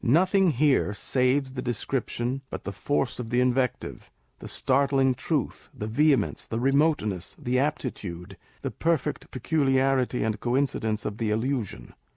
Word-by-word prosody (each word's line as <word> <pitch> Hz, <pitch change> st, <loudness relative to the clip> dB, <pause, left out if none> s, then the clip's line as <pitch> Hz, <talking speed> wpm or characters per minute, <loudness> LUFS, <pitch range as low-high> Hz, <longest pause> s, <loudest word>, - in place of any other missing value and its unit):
Nothing 185 Hz, -, +4 dB
here 130 Hz, -6 st, +2 dB
saves 130 Hz, +4 st, +1 dB
the 130 Hz, -, -4 dB
description 125 Hz, +1 st, -2 dB
but -, -, -6 dB
the 100 Hz, -, -4 dB
force 135 Hz, +4 st, -1 dB
of 120 Hz, -2 st, -5 dB
the 120 Hz, +1 st, +1 dB
invective; 125 Hz, 0 st, -1 dB, 0.3 s
the -, -, -8 dB
start 135 Hz, +1 st, +1 dB
ling 135 Hz, -1 st, +3 dB
truth, 135 Hz, +2 st, -3 dB
the 105 Hz, -, -5 dB
vehemence, 140 Hz, +6 st, +1 dB
the 115 Hz, -, -2 dB
remoteness, 135 Hz, -, +1 dB
the 125 Hz, +1 st, 0 dB
aptitude, 105 Hz, -, -3 dB, 0.3 s
the -, -, -2 dB
perfect 165 Hz, -4 st, -1 dB
peculiarity 135 Hz, -2 st, +1 dB
and 110 Hz, -1 st, -1 dB
coincidence 120 Hz, -4 st, 0 dB
of 105 Hz, -, -4 dB
the 115 Hz, -2 st, 0 dB
allusion. 110 Hz, -, -2 dB
130 Hz, 145 wpm, -26 LUFS, 115-140 Hz, 0.3 s, Nothing